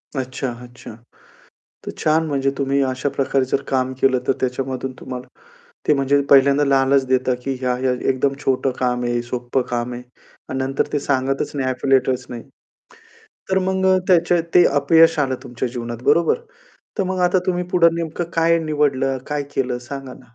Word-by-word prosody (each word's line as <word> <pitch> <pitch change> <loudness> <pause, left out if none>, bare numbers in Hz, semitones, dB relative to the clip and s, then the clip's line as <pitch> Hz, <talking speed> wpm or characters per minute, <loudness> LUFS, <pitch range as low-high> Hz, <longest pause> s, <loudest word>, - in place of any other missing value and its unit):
अच्छा, 130 0 -3
अच्छा. 120 0 -12 0.9
तर - - -4
छान 160 +1 +2
म्हणजे 135 -2 0
तुम्ही 140 0 +1
अशा 130 +2 -2
प्रकारे 135 -1 +1
जर 135 +2 -1
काम 130 -1 0
केलं 130 -1 +3
तर - - +3
त्याच्यामधून 130 0 -3
तुम्हाला 125 -1 -7 0.6
ते 150 - +6
म्हणजे 140 0 +2
पहिल्यांदा 140 +1 +5
लालच 135 0 +3
देतात, 130 -1 +1
की 135 - -1
ह्या-ह्या 125 0 0 0.2
एकदम 135 +1 0
छोटं 135 0 +1
काम 125 -1 0
आहे, 120 0 0
सोपं 125 +1 -2
काम 120 0 -2
आहे, 120 +1 -7 0.5
अन् 130 - -3
नंतर 135 +1 -1
ते 145 - +1
सांगतच 135 -1 -1
नाही, 130 -2 -1
एफिलिएटच 130 -1 +1
नाही. 120 -2 -6 1.1
तर 190 - +3
मग 190 0 0
अ, 185 0 +5
त्याचे 175 -1 +4
ते 175 - +7 0.2
अपयश 160 +2 +5
आलं 135 -2 +1
तुमच्या 120 +1 -4
जीवनात 120 -1 -6
बरोबर. 170 - +3 0.6
तर - - +3
मग 185 0 -2
आता 180 +1 +3
तुम्ही 180 -1 0
पुढं 170 -2 +4
नेमकं 170 +1 -3
काय 165 0 +3
निवडलं, 135 -3 0
काय 150 -1 -1
केलं 125 -2 -1
सांगा 130 +1 -8
ना. - - -14
135 Hz, 170 wpm, -20 LUFS, 130-150 Hz, 1.1 s, ते